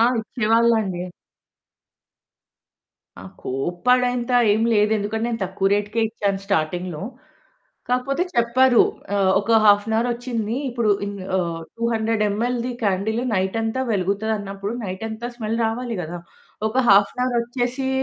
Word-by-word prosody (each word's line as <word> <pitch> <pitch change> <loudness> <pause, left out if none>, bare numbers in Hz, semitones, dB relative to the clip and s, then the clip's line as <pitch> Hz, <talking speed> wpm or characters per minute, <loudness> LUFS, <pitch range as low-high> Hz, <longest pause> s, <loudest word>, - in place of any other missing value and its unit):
ఆ! - - +6 0.2
ఇచ్చేవాళ్ళండి. 220 -4 +1 2.2
ఆ! - - -10 0.2
కోపడేంత 245 - 0 0.2
ఏం 220 +2 +1
లేదు 210 0 +3
ఎందుకంటే 215 +2 -2
నేను 230 -2 -3
తక్కువ 190 +1 0
రేట్‌కే 205 +2 0
ఇచ్చాను 200 -3 -2
స్టార్టింగ్‌లో. 175 -1 -1 0.9
కాకపోతే 255 +6 0
చెప్పారు. 240 +1 +5 0.3
ఆహ్, 190 -1 +3
ఒక 225 +2 +3
హాఫ్ 205 -1 +6
ఎన్ 220 - 0
అవర్ 235 +2 +1
వచ్చింది. 235 -2 -3
ఇప్పుడు 235 -3 0 0.2
ఇన్ 205 - -5 0.2
ఆహ్, 170 -2 -2 0.2
200 225 -1 0
ఎంఎల్ 235 +5 -1
ది 250 - -3
క్యాండిల్ 205 +3 0
నైటంతా 225 +6 -1
వెలుగుతదన్నప్పుడు 200 +1 -2
నైటంతా 220 +5 -5
స్మెల్ 225 -1 -2
రావాలి 235 +1 -3
కదా! 175 +2 -6 0.5
ఒక 220 - -6
హాఫ్ 200 0 +6
ఎన్ 250 - -2
అవర్ 250 -1 0
వచ్చేసి 245 +2 -2
220 Hz, 125 wpm, -22 LUFS, 200-235 Hz, 2.2 s, ఆ